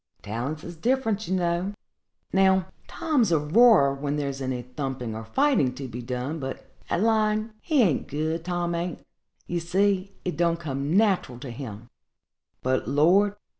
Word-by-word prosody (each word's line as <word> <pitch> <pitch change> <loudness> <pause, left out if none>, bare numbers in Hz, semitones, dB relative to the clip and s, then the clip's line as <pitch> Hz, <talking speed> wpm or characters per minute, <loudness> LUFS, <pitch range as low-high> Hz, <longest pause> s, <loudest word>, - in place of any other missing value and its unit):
Talents 125 +9 -4
is 175 - -8
different, 225 0 0
you 190 - 0
know. 175 +2 0 0.6
Now, 190 -1 +4 0.2
Tom's 265 - +1
a 165 - +5
roarer 155 - +5
when 140 +1 -2
there's 140 -2 -3
any 130 -2 -2
thumping 125 -2 -4
or 110 +1 -6
fighting 255 - +2
to 135 0 -6
be 120 0 -6
done; 125 +6 -3
but 135 -1 -6 0.2
at 175 - +1
lying 215 0 +2
he 295 -6 +3
an't 170 -9 +1
good, 160 +3 -2
Tom 175 -1 -1
an't; 170 +1 -3 0.5
ye 175 - -2
see 195 +3 0
it 180 - -2
don't 170 0 +2
come 145 +1 -1
natural 195 - +2
to 130 - -6
him; 115 -2 -8 0.7
but, 130 0 0
Lord! 180 +9 +4
170 Hz, 160 wpm, -26 LUFS, 135-195 Hz, 0.7 s, a